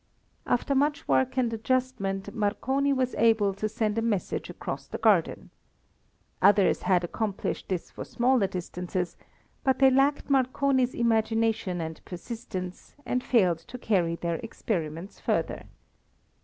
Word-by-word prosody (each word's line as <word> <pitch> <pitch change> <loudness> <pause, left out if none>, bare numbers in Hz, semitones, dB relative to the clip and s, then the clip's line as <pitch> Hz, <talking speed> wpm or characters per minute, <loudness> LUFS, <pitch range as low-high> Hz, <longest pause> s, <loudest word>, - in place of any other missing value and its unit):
After 245 +3 +1
much 285 +2 +1
work 130 - +2
and 240 -3 +1
adjustment 215 -5 -1
Marconi 260 +7 0
was 260 -2 0
able 220 -3 +4
to 215 +2 -3
send 220 0 -1
a - - 0
message 220 -5 -1
across - - -6
the - - -5
garden. - - +2 0.9
Others 200 0 +4
had 180 -2 +2
accomplished 200 +3 -3
this 185 -3 -3
for - - -7
similar 245 -4 +2
distances, 180 -1 -4 0.5
but 265 -2 +2
they 270 -1 +6
lacked 275 +2 +2
Marconi's 265 -1 +2
imagination 225 -4 +1
and 160 -1 -6
persistence, 185 -1 -7
and 250 0 -1
failed 185 -9 +3
to 240 +9 -10
carry 180 -8 +1
their 170 -1 -2
experiments 175 -4 -4
further. - - -1
220 Hz, 130 wpm, -27 LUFS, 185-255 Hz, 0.9 s, they